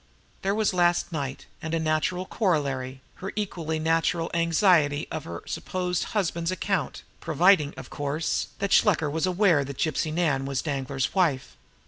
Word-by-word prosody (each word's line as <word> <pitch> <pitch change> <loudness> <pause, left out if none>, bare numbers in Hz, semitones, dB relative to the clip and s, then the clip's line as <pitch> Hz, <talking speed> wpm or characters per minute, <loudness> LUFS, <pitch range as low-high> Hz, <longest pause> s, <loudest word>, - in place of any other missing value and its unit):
There 195 +1 0
was 215 -2 +1
last 175 0 +2
night 140 -4 -4 0.2
and, 160 +1 -2
a - - 0
natural 160 +3 0
corollary, 140 - -1 0.2
her 195 - -5
equally 170 -6 -2
natural 165 +1 +1
anxiety 165 -3 +3
on - - -3
her 85 -9 -8
supposed 180 -1 -2
husband's 170 -3 0
account, 190 +1 -2 0.2
providing, 160 -1 +3
of - - -9
course, 145 +2 -1
that 200 -1 -2
Shluker 160 -8 +4
was 160 +4 0
aware 180 -5 +3
that 140 -1 -7
Gypsy 155 0 0
Nan 150 -5 +1
was 135 -1 -2
Danglar's 135 -3 -2
wife. 160 -9 +1
160 Hz, 150 wpm, -26 LUFS, 145-180 Hz, 0.2 s, Shluker